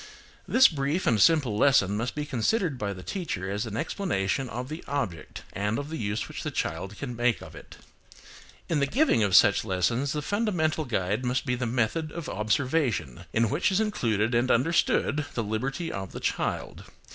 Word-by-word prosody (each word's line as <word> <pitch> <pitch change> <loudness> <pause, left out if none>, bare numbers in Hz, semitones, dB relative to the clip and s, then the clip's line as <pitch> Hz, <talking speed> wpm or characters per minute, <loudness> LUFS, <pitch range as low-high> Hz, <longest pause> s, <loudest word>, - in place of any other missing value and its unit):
This 260 +1 +7
brief 150 +3 -1
and 110 -4 +3
simple 145 -8 +4
lesson 105 -5 +4
must 120 +4 -2
be 150 0 -2
considered 145 - 0
by 100 -1 -2
the 95 -2 -8
teacher 105 - -4
as 105 +3 -2
an 110 0 -5
explanation 135 - -1
of 125 +2 -5
the 155 +4 -7
object 115 - -4
and 105 +3 -1
of 145 +1 -4
the 160 - -3
use 105 0 -2
which - - -7
the - - -3
child 95 +5 -3
can 125 -4 -5
make 120 0 +1
of - - -11
it. - - -12 0.9
In 160 - +1
the 140 - +2
giving 255 - +3
of 100 -3 +3
such - - +6
lessons 115 +9 0
the 150 -1 -3
fundamental 175 -7 0
guide 105 -1 -1
must 125 +2 -1
be 125 - 0
the 125 -1 -2
method 125 +7 -1
of 170 -1 -6
observation, 110 - -1
in 115 +1 +2
which 155 +7 +1
is 190 - +2
included 115 - 0
and 120 +2 +2
understood 150 +2 +2
the 115 - 0
liberty 130 +10 -3
of 95 -1 -6
the - - -5
child. - - -3
125 Hz, 190 wpm, -27 LUFS, 105-155 Hz, 0.9 s, This